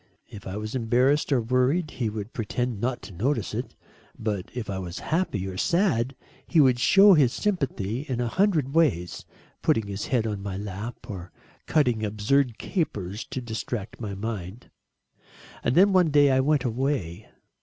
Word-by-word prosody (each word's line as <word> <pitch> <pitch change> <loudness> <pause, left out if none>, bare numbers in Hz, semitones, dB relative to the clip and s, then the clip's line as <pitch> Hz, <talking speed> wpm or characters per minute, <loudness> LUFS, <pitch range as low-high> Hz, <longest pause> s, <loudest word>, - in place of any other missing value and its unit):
If 100 - -10
I 95 +2 -4
was 110 +1 -5
embarrassed, 130 +5 +2
or 135 - +4
worried, 130 +8 +1
he 115 -4 -2
would 105 +1 -6
pretend 120 0 -2
not 125 0 -2
to 100 - -9
notice 115 +5 -1
it, - - -4 0.4
but 105 -4 -3
if 125 -3 -4
I 95 -1 -3
was 90 -2 -6
happy, 155 - -1
or 95 -1 -5
sad, 135 - +1 0.3
he 170 - +3
would 130 -4 +5
show 195 +9 +7
his 140 -8 +4
sympathy 135 - -2
in 125 -2 -1
a 120 - 0
hundred 160 - +1
ways 120 - +1 0.4
putting 110 -2 +2
his 100 0 -5
head 120 -4 +1
on 105 -3 -3
my 100 -1 -4
lap, 105 +3 -6
or 90 -3 -7 0.4
cutting 125 -8 +2
absurd 110 +4 +1
capers 105 - -3
to 130 - -5
distract 115 -2 -5
my 100 -3 -4
mind. 105 +1 -6 0.9
And 125 - +1
then 195 +2 +6
one 180 -3 +4
day 145 -1 +5
I 130 - +3
went 140 0 +2
away. 115 - -2
120 Hz, 170 wpm, -26 LUFS, 105-140 Hz, 0.9 s, show